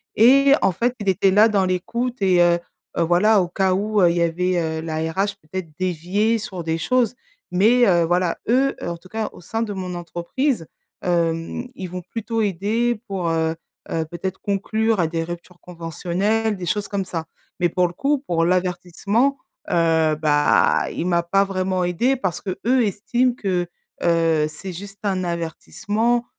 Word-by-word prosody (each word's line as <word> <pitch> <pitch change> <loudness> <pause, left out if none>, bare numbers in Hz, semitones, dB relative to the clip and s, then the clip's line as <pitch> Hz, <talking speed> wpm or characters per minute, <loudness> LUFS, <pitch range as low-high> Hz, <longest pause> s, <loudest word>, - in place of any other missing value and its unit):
et 275 +5 +6
en 190 - +3
fait, 240 +6 0
il 205 - -6
était 190 0 +3
là 210 +3 +6
dans 200 -3 +2
l'écoute 235 +7 -2
et 185 -2 +4
heu 175 0 +3 0.4
heu, - - +2
voilà 190 +5 +4
au 175 - -1
cas 190 +2 +1
où, 210 +2 +1
heu, 175 -2 +5
il 175 - -2
y - - +2
avait, 175 +2 +1
heu, 160 -1 -2
la 160 -1 -4
RH 195 +4 -1
peut-être 165 +2 -6
déviait 185 +6 0
sur 190 -5 -6
des 160 0 -1
choses. 250 +6 +1 0.3
Mais, 225 +6 +4
heu, 175 -2 +4
voilà 175 +1 +1
eux, 270 +3 +3
heu, - - -2
en 170 - -4
tout 185 - -18
cas, 220 +1 -3
au - - -14
sein 225 +6 -2
de 210 -2 -4
mon 185 -2 -5
entreprise, 175 - -2 0.3
hem, 170 +6 -1
ils 185 -5 -7
vont 180 +1 -5
plutôt 225 +3 -3
aider 210 +4 0
pour, 185 -4 -2
heu 160 0 0 0.3
heu, 160 -1 -1
peut-être 175 +3 -5
conclure 215 +2 0
à 165 - +2
des 165 0 -2
ruptures 175 +1 -8
conventionnelles, 185 +6 -1
des 180 -2 -6
choses 205 +3 -1
comme 200 -2 -2
ça. 165 -3 -4 0.3
Mais 175 - +3
pour 180 +1 +2
le 170 - -9
coup, 280 +7 +1
pour 165 -1 +1
l'avertissement, 185 +8 0 0.3
heu, 160 -2 +3
bah 150 -1 +3
il 170 - -3
m'a 170 -1 +2
pas 195 +3 +3
vraiment 185 -1 -1
aidée 180 +10 +1
parce 185 -10 -3
qu'eux 235 +6 +1
estiment 240 +5 +1
que, 185 -7 -1 0.4
heu, 165 -2 +3
c'est 185 +3 -8
juste 200 +3 -9
un 190 -3 0
avertissement. 205 +7 -1
185 Hz, 180 wpm, -22 LUFS, 170-215 Hz, 0.4 s, et